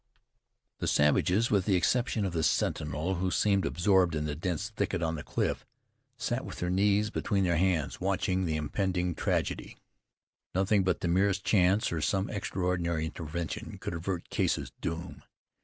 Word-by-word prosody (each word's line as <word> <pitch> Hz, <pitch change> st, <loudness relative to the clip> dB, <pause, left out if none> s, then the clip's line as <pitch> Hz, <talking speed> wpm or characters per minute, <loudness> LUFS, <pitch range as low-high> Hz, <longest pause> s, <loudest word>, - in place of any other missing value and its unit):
The -, -, -2 dB
savages, 90 Hz, +9 st, +3 dB
with 100 Hz, -3 st, +3 dB
the 100 Hz, -, +3 dB
exception 110 Hz, +3 st, +1 dB
of 95 Hz, -, -2 dB
the 80 Hz, -, 0 dB
sentinel 80 Hz, +3 st, 0 dB
who 95 Hz, +1 st, 0 dB
seemed 100 Hz, +1 st, +2 dB
absorbed 90 Hz, -2 st, +3 dB
in 75 Hz, 0 st, -1 dB
the 75 Hz, -, -2 dB
dense 90 Hz, +7 st, -3 dB
thicket 100 Hz, -4 st, -1 dB
on 80 Hz, 0 st, 0 dB
the 75 Hz, -, -4 dB
cliff, -, -, -2 dB, 0.5 s
sat -, -, -2 dB
with -, -, -7 dB
their 90 Hz, 0 st, -1 dB
knees 105 Hz, +3 st, +2 dB
between 100 Hz, -3 st, 0 dB
their 85 Hz, -3 st, +2 dB
hands, 90 Hz, -4 st, 0 dB
watching 95 Hz, 0 st, 0 dB
the 80 Hz, -2 st, -1 dB
impending 90 Hz, +3 st, -1 dB
tragedy. -, -, -2 dB, 0.8 s
Nothing 95 Hz, +1 st, +3 dB
but 95 Hz, -, 0 dB
the -, -, 0 dB
merest 95 Hz, +2 st, +2 dB
chance, 95 Hz, +1 st, +3 dB
or 80 Hz, -2 st, -2 dB
some 95 Hz, +5 st, 0 dB
extraordinary 90 Hz, -4 st, -1 dB
intervention, 80 Hz, +1 st, -5 dB
could -, -, -5 dB
avert 85 Hz, +1 st, -4 dB
Case's -, -, 0 dB
doom. 85 Hz, +2 st, -4 dB
90 Hz, 160 wpm, -30 LUFS, 85-100 Hz, 0.8 s, savages